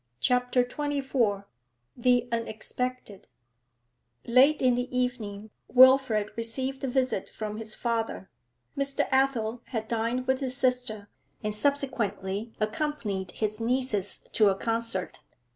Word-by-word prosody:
CHAPTER 250 - +2
XXIV 265 -7 -1 0.5
THE 245 0 +2
UNEXPECTED 230 -1 -4 1.0
Late 265 +5 +5
in 255 -1 +4
the 245 +1 -1
evening 220 -4 -3 0.2
Wilfrid 255 -5 +5
received 260 +4 -4
a - - 0
visit 255 -5 0
from 215 -1 -5
his 220 -1 -4
father. 230 -4 -2 0.4
Mr. 275 0 0
Athel 250 -4 +1
had 220 -3 -4
dined 235 +3 -1
with 260 0 +1
his 260 -2 -3
sister, 250 -6 0 0.4
and 210 0 +1
subsequently 215 -5 -1
accompanied 215 - -2
his 215 +3 -2
nieces 230 -4 0
to 215 -2 +5
a 195 - +1
concert. 225 -3 -2
235 Hz, 115 wpm, -28 LUFS, 215-260 Hz, 1.0 s, Late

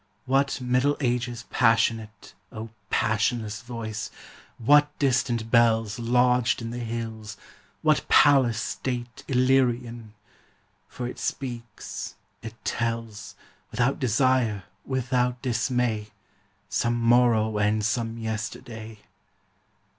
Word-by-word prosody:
What 135 +1 +1
Middle 125 +3 +1
Ages 120 -2 -1
passionate, 115 -2 +1 0.2
O 110 0 -7 0.2
passionless 110 0 0
voice! 115 -3 -5 0.5
What 145 +5 +5
distant 125 -4 0
bells 115 -2 +3
Lodged 125 +1 +2
in 115 -1 -5
the 120 - -5
hills, 110 -2 -5 0.5
what 155 -1 +2
palace 130 -6 +5
state 120 0 -4
Illyrian! 125 -4 +1 0.7
For 125 - -6
it 125 - -7
speaks, 120 -5 -5 0.3
it 115 0 -8
tells, 115 -3 -3 0.3
Without 125 +4 0
desire, 125 -4 +2 0.2
without 125 -1 0
dismay, 120 -3 0 0.6
Some 120 0 0
morrow 115 -2 +3
and 105 +1 +1
some 115 +1 -1
yesterday. 110 0 -6
120 Hz, 95 wpm, -26 LUFS, 110-125 Hz, 0.7 s, What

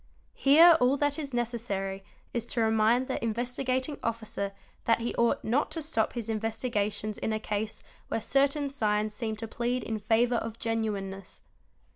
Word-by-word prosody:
Here 320 +4 +7
all 255 +3 +3
that 290 +2 0
is 285 -3 -4
necessary 225 -5 -2 0.3
is 235 -1 -2
to 235 - -1
remind 225 +3 +3
the - - -3
Investigating 255 +4 -1
Officer 220 -3 -3 0.3
that 230 - +3
he 235 +1 -2
ought 235 0 +1
not 250 +7 +1
to 325 - -3
stop 255 -8 0
his 235 -3 -4
investigations 215 -1 -2
in - - -1
a 215 - 0
case 215 0 -3 0.2
where - - -1
certain 275 +4 +1
signs 215 -5 0
seem 220 0 -3
to 225 +1 -6
plead 240 +2 -1
in 220 -1 -3
favour 230 +3 +2
of 225 0 -4
genuineness. 205 -4 -3
230 Hz, 160 wpm, -29 LUFS, 215-250 Hz, 0.3 s, Here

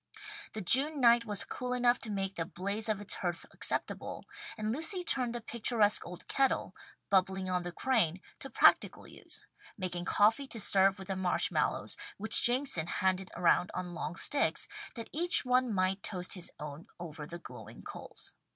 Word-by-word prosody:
The 215 - -5
June 280 - +8
night 235 -2 +4
was 205 -3 -3
cool 250 0 -5
enough 245 0 +2
to 220 - -6
make 195 -1 -3
the 165 - -3
blaze 200 +6 -3
on 215 -2 -1
its 205 - 0
hearth 175 -2 -4
acceptable, - - -3 0.3
and 215 +1 -3
Lucy 355 - -1
turned 250 -7 -1
the 240 - -5
picturesque 225 -2 +1
old 180 0 -11
kettle, 270 -1 -1 0.4
bubbling 190 -1 0
on 180 0 0
the 175 0 -6
crane, 185 -5 0 0.2
to 270 - -8
practical - - +3
use, - - -14 0.3
making 180 -3 -5
coffee 225 +7 +2
to 235 - -6
serve 195 -1 +4
with 190 0 -11
the 195 - -2
marsh 185 -1 -1
mallows, - - -2 0.2
which 220 +2 +2
Jameson 245 - +2
handed 185 +1 -1
around 180 +1 +2
on 180 -1 -5
long 170 -1 -5
sticks, 285 +10 +1 0.3
that 230 -2 -7
each 345 -1 +7
one 250 -1 +1
might 190 0 -1
toast 180 -3 -3
his 180 -3 -3
own 150 +2 -9
over 155 -3 -8
the 170 - -8
glowing 175 - -13
coals. - - -10
200 Hz, 175 wpm, -31 LUFS, 180-240 Hz, 0.4 s, June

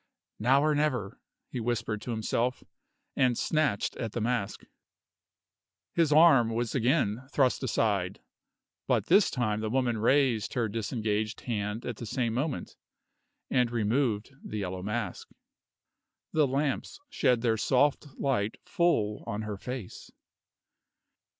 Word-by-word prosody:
"Now 135 +5 +4
or 155 0 +3
never," 130 -9 -1 0.3
he 125 - -3
whispered 115 -2 -2
to - - -8
himself, 115 +2 -1 0.5
and 125 -3 +2
snatched 150 -10 0
at 115 -3 -4
the - - -2
mask. 115 -3 -2 1.3
His 165 -3 +2
arm 145 -7 +6
was 115 0 -2
again 130 -2 +1
thrust 130 -4 +2
aside; 100 -7 0 0.7
but - - +2
this 195 +4 +5
time 110 -4 -1
the 110 0 -2
woman 120 -2 0
raised 120 -2 +2
her 120 -2 +1
disengaged 110 0 -2
hand 105 -1 -3
at 120 -3 -4
the 120 - -7
same 115 +1 -1
moment, 135 +4 -3 0.8
and 125 -2 +3
removed 115 0 0
the 110 - -5
yellow 95 -2 -3
mask. 105 +3 -4 1.0
The 155 -2 +4
lamps 135 +1 -2
shed 125 -2 +1
their 115 -2 +2
soft 135 +7 +2
light 115 -6 0
full 170 - +1
on 110 -1 -3
her 105 -1 -4
face. 125 -5 -7
120 Hz, 130 wpm, -29 LUFS, 110-135 Hz, 1.3 s, arm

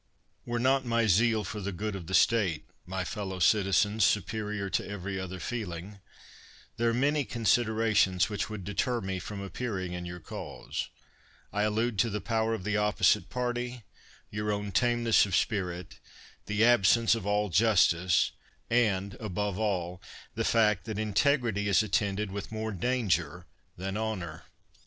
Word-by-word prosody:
Were 120 0 -1
not 130 +2 +2
my 115 -2 +1
zeal 110 +2 +3
for 105 +3 -5
the 100 +1 -3
good 105 +3 -4
of 90 -4 -7
the 95 - 0
state, 95 -10 +3 0.2
my 95 0 -2
fellow 95 -1 -4
citizens, 105 +4 +3
superior 105 0 0
to 95 +1 -1
every 100 -1 -4
other 95 0 -6
feel 105 -2 -4
ing, 95 +5 -9 0.8
there 115 0 +2
are - - +2
many 140 +5 +1
considerations 110 -5 +2
which 105 0 -3
would 105 -3 -6
deter 120 +5 -1
me 95 -2 -3
from 100 +2 -6
appearing 100 -3 -4
in 90 0 -5
your 90 0 -7
cause; 80 - -6 0.6
I 105 - 0
allude 110 +1 0
to 115 - +3
the 105 0 -2
i)ower 115 0 0
of 100 - -7
the 105 +1 0
opposite 105 -2 +2
party, 125 -1 -3 0.5
your 105 +1 -2
own 105 0 -3
tameness 120 +1 +3
of 95 - -1
spirit, 90 -6 -2 0.5
the 105 +2 +3
absence 115 -1 +5
of 110 -4 -3
all 105 0 +1
justice, 90 -3 +3 0.4
and, 100 -5 +2
above 105 -1 -3
all, 90 -5 -2 0.3
the - - -2
fact 105 -5 +2
that 110 -2 -4
integrity 110 0 +1
is 100 +2 +4
attended 100 -1 -1
with 100 +2 -6
more 110 0 -3
danger 90 - -1 0.3
than 95 +2 -4
honor. 95 -8 -4
105 Hz, 155 wpm, -29 LUFS, 95-115 Hz, 0.8 s, absence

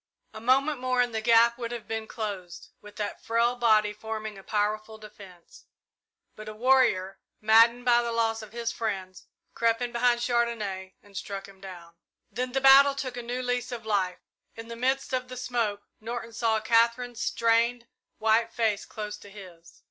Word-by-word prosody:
A 220 - -9
moment 270 +4 +2
more 255 0 0
and 245 -1 +2
the 220 - -2
gap 235 +1 +4
would 235 -1 -4
have 240 -2 -7
been 220 0 -4
closed, 195 -6 -6
with 210 0 -14
that 210 -1 -5
frail 235 +2 +1
body 215 -3 +3
forming 215 0 -6
a 195 - -11
powerful 215 +1 -2
defence; 195 -5 -15 0.7
but 215 0 -9
a 215 - -9
warrior, 230 -6 +2 0.2
maddened 230 +3 +5
by 240 -1 +5
the 235 0 -3
loss 225 -1 0
of 215 - -11
his 235 0 -3
friends, 195 -6 -5 0.3
crept 230 -1 +1
in 245 -1 -3
behind 240 0 +2
Chandonnais 220 -6 -1
and 205 -1 -19
struck 195 -1 -6
him 195 -1 -17
down. 175 -3 -11 0.4
Then 250 +4 -3
the 270 - 0
battle 275 +1 +7
took 255 -3 -4
a 245 - -4
new 245 +2 -4
lease 245 0 -2
of 235 -2 -6
life. 190 -4 -1 0.3
In 225 0 -9
the 230 - -6
midst 265 +3 -1
of 255 0 -1
the 255 0 -8
smoke 230 -5 -2 0.2
Norton 230 +1 -6
saw 225 -1 +1
Katherine's 235 +2 +1
strained, 230 +1 +1 0.3
white 225 +1 +2
face 220 -3 0
close 210 -1 -6
to 205 - -14
his. 180 -4 -14
230 Hz, 180 wpm, -27 LUFS, 210-240 Hz, 0.7 s, battle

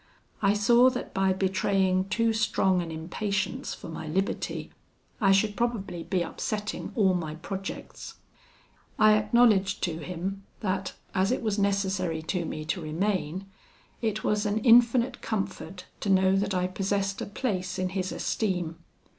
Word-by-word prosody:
I 200 -1 +4
saw 240 +4 +6
that 250 -1 -5
by 195 0 +2
betraying 190 0 +1
too 230 +2 +2
strong 200 -4 +2
an 170 - -5
impatience 190 +8 -3
for - - -10
my 160 -1 -6
liberty, 190 +6 -2 0.5
I 195 -2 +5
should 205 +2 +3
probably 220 -7 -2
be 180 +1 0
upsetting 210 +4 -4
all 195 -5 +4
my 160 -4 -3
projects. 195 +4 -7 0.8
I 215 0 +6
acknowledged 210 -2 +3
to 165 -2 -1
him, 180 +4 -4 0.2
that, 190 -2 -2 0.2
as 190 +2 +2
it 255 - -1
was 215 -2 0
necessary 190 -5 0
to 170 +1 -2
me 155 -1 -5
to 175 +3 -2
remain, 185 +2 -1 0.6
it 215 -2 -1
was 210 0 +1
an 205 +1 0
infinite 240 +1 +5
comfort 190 -3 -4
to 205 - -3
know 190 0 +4
that 195 0 0
I 180 0 +1
possessed 195 +1 -1
a - - -3
place 195 -5 -2
in 185 -1 -1
his 185 0 -2
esteem. 180 -6 -1
195 Hz, 150 wpm, -27 LUFS, 185-210 Hz, 0.8 s, saw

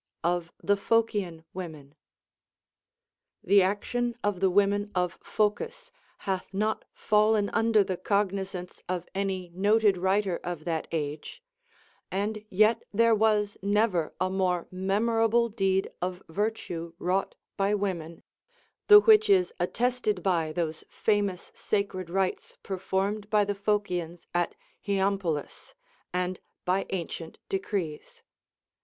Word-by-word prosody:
Of 175 0 0
the 205 - +3
Phocian 205 -6 0
Women. 155 -6 -8 1.5
The 200 +2 +5
action 235 +5 -1
of 205 -3 0
the 190 0 +3
women 205 +2 +2
of 180 -1 -1
Phocis 470 - -1 0.3
hath 190 -1 -2
not 215 +3 -1
fallen 210 -1 +2
under 225 -2 +4
the 185 -2 -3
cognizance 195 -3 -2
of 180 -1 -2
any 190 -2 -2
noted 205 +1 +3
writer 190 -1 +1
of 175 -3 -5
that 165 -2 -2
age, 155 - -4 0.7
and 205 +3 -2
yet 215 +4 +4
there 230 +2 +4
was 210 -1 +2
never 200 -4 +1
a 185 - +2
more 180 -2 0
memorable 225 +5 +2
deed 195 -3 0
of 180 +1 -3
virtue 175 -3 -3
wrought 185 +2 -1 0.2
by 195 0 +1
Avomen, 170 -5 -3 0.3
— 485 - -39
the 420 0 +10
which 435 0 +6
is 390 +3 +4
attested 245 -6 0
by 170 -5 +1
those 160 -1 -3
famous 205 -4 0
sacred 195 -4 -2
rites 190 +1 -2
performed 195 +2 -2
by 210 -1 +3
the 205 - -1
Phocians 185 -4 -2
at 175 0 0 0.3
Hy 200 - -1
ampolis, 195 - -1 0.4
and 180 0 -2 0.3
by 185 +2 +1
ancient 170 -3 -5
decrees. 190 -5 -3
195 Hz, 125 wpm, -28 LUFS, 180-210 Hz, 1.5 s, the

